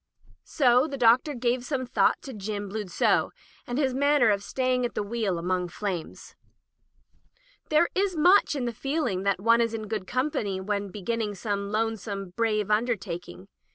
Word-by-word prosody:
So 255 -1 +3
the 280 -2 -5
Doctor 250 +4 +4
gave 245 0 0
some 260 0 -2
thought 250 - +1
to 265 - -7
Jim 205 -1 -5
Bludsoe, 205 -3 +1 0.4
and 245 - -3
his 270 -3 +1
manner 280 -3 +4
of 200 -1 0
staying 255 +3 0
at 240 - -3
the - - -1
wheel 205 -4 -2
among 180 +1 -1
flames. 180 -2 -6 1.3
There 310 +3 +4
is 380 -2 0
much 355 +1 +5
in 265 -3 -2
the 240 - -2
feeling 270 - -2
that 200 -2 +1
one 230 +3 +4
is 230 -1 0
in 215 -1 -5
good 210 -3 -4
company 245 -7 -1
when 200 +1 -2
beginning 210 +2 -3
some 200 -1 -3
lonesome, 215 -3 -2
brave 215 0 0
undertak 210 -6 -1
ing. 185 - -12
225 Hz, 165 wpm, -26 LUFS, 200-255 Hz, 1.3 s, much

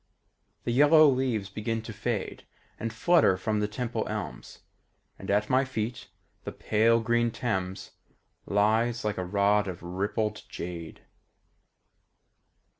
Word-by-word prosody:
The - - -1
yellow 150 +4 +7
leaves 130 -7 0
begin 110 +3 -3
to 115 - -7
fade 110 -1 -4 0.3
And 115 - -3
flutter 130 - +3
from 105 +3 -1
the 105 - 0
Temple 115 +1 -3
elms, 105 -3 -6 0.6
And - - -8
at 105 +1 +2
my 130 +1 +3
feet 120 -3 -4 0.4
the - - -5
pale 115 +2 +2
green 120 +1 +1
Thames 95 -6 -3 0.6
Lies 110 +3 +1
like 105 -3 -1
a - - -1
rod 100 +2 +2
of 90 -2 -6
rippled 100 +5 -2
jade. 85 -2 -7
110 Hz, 125 wpm, -28 LUFS, 100-120 Hz, 0.6 s, yellow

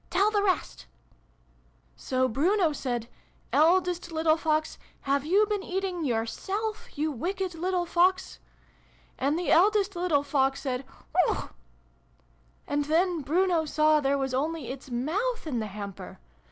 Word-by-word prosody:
Tell 410 +2 +2
the 415 -1 +2
rest! 380 -3 -1 0.3
" - - -37
" - - -34 0.3
So 260 0 0
Bruno 325 - +2
said 240 -5 -3 0.2
' - - -28
Eldest 350 +2 +3
little 320 -1 +3
Fox, 310 -1 -1 0.2
have 280 +1 0
you 400 +5 +4
been 415 -1 -2
eating 380 -2 -3
yoiirself, 395 - -3
you 305 +1 0
wicked 365 +7 -3
little 355 +2 -1
Fox? 360 +2 +1 0.4
' - - -33
And 285 +4 +1
the 355 - -1
eldest 400 +2 +4
little 345 -5 +1
Fox 270 -1 +1
said 260 -1 -3
' - - -28
Whihuauch! - - +1 0.6
' - - -36
And 290 0 0
then 335 +2 +1
Bruno 340 +4 +2
saw 305 0 +3
there 280 -1 +1
was 270 -1 -2
only 300 +1 -2
its 265 0 -9
moutk 335 - -2
in 270 -7 -2
the 215 - -3
hamper 200 -1 -8
315 Hz, 155 wpm, -27 LUFS, 270-370 Hz, 0.6 s, you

